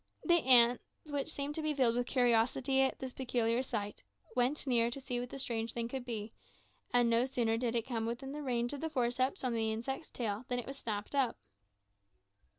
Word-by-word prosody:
The 345 -1 +4
ants, 245 -1 +7 0.2
which 290 0 -3
seemed 285 0 -3
to 315 - -3
be 305 -1 -1
filled 245 -4 +3
with 245 0 0
curiosity 250 +2 +2
at 265 - +1
this 260 -2 -6
peculiar 240 -2 0
sight, 210 -5 -4 0.3
went 255 +5 +1
near 235 -3 +3
to 250 - -5
see 255 -2 -3
what 245 0 -5
the - - -7
strange 230 -4 -2
thing 235 -1 -2
could 260 -1 -5
be; 220 -2 -5 0.6
and 245 -1 +4
no 230 +1 +3
sooner 240 -4 0
did 235 0 -1
one 230 - +1
come 230 -2 -3
within 250 +4 -4
the 300 +1 -5
range 245 -2 -1
of 285 - -6
the 320 - -2
forceps 255 +3 0
on 250 -2 0
the 220 -1 0
insect's 265 +8 -4
tail, 220 -2 -3
than 250 - -1
it 245 - -3
was 275 0 -7
snapped 210 0 -4
up. 270 -4 +1
245 Hz, 210 wpm, -33 LUFS, 230-270 Hz, 0.6 s, ants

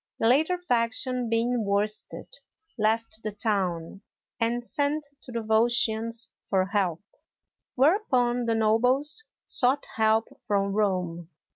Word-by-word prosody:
The - - -1
latter 310 +9 +3
faction 245 -5 -1
being 230 +1 +1
worsted, 205 +1 -1 0.5
left 220 0 -1
the 215 - -3
town, 195 -4 -2 0.4
and 240 +1 0
sent 290 +3 -1 0.2
to 250 - -12
the 235 -1 -3
Volscians 225 0 +2 0.2
for 190 -2 +2
help; 190 -3 -1 0.7
whereupon, 255 - +2
the 230 -1 +1
nobles 250 - +2 0.2
sought 265 +3 +1
help 220 0 +3 0.2
from 200 -1 +1
Rome. 180 -5 -1
225 Hz, 115 wpm, -26 LUFS, 210-245 Hz, 0.7 s, latter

